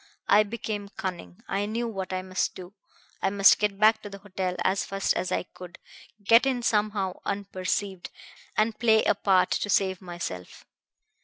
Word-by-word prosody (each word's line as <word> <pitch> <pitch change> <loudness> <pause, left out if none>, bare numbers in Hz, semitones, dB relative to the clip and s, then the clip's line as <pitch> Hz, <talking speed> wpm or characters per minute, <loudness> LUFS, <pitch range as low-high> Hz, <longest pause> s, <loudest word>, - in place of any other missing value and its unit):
I 205 - +6
became 210 -1 -4
cunning. 180 - -7
I 200 +1 -1
knew 235 +2 -2
what 195 -4 -5
I 185 0 -2
must 185 0 -2
do. 185 +1 -10 0.5
I 195 - +2
must 200 0 +5
get 205 -2 0
back 215 +1 +4
to 205 - -8
the 200 - -9
hotel 190 -2 -4
as 195 - +1
fast 195 0 -1
as 185 - -2
I - - 0
could, 180 0 -12 0.5
get 230 +6 +5
in 250 -3 -1
somehow 210 -4 0
unperceived, 195 -1 -3 0.5
and 215 0 +1
play 220 -2 +4
a - - +3
part 195 -2 +2
to 205 - -1
save 190 -1 +1
myself. 175 - -7
200 Hz, 170 wpm, -27 LUFS, 185-215 Hz, 0.5 s, I